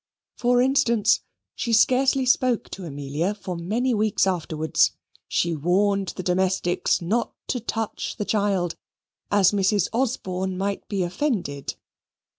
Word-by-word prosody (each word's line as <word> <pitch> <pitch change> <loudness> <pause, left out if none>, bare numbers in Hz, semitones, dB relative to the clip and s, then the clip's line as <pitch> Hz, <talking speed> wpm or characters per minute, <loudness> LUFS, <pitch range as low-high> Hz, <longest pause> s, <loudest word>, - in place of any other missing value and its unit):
For 245 0 +3
instance, 255 -5 +3 0.3
she 235 - -3
scarcely 260 +3 +4
spoke 250 -2 +2
to 190 - -7
Amelia 145 +6 -2
for 185 -3 -6
many 220 +10 -1
weeks 215 -2 +2
afterwards. 160 -4 +1 0.3
She 170 -1 0
warned 195 +5 +1
the 185 - -5
domestics 180 -1 +1
not 220 +8 -1
to 250 - 0
touch 225 -1 -3
the 210 - -2
child, 200 -5 0 0.6
as 200 -2 +4
Mrs. 200 -1 +2
Osborne 190 -7 -1
might 200 +1 -3
be 195 -3 -1
offended. 175 - -2
200 Hz, 125 wpm, -24 LUFS, 180-235 Hz, 0.6 s, scarcely